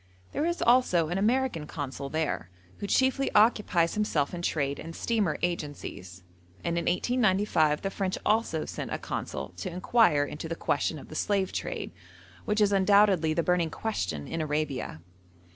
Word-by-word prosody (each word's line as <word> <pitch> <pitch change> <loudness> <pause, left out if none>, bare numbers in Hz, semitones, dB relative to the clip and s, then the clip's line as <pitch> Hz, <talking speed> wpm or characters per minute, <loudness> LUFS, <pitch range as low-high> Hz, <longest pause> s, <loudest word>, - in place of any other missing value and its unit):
There 315 - 0
is 345 0 -1
also 235 -10 +4
an 175 +3 -1
American 225 - +1
Consul 140 -2 -5
there, 155 - -2 0.3
who 205 - -4
chiefly 265 +4 +2
occupies 210 -6 +4
himself 175 -9 0
in 175 - -4
trade 140 -4 -1
and 165 +1 -8
steamer 215 -9 0
agencies, 145 - -4 0.4
and 170 0 -1
in 170 - -1
1895 185 -6 +2
the 195 - -1
French 190 -1 -2
also 210 -7 +1
sent - - -6
a - - -1
Consul 70 +1 -5
to 90 - -4
inquire 180 -4 +3
into 150 +2 -6
the 165 - -2
question 160 - -1
of - - -11
the - - -9
slave 195 +2 0
trade, - - -4 0.5
which 215 +1 +1
is 205 -1 +4
undoubtedly 195 -5 +4
the 170 - +1
burning 180 -2 +2
question 95 - -3
in 165 - -3
Arabia. 150 - -2
175 Hz, 160 wpm, -28 LUFS, 150-210 Hz, 0.5 s, also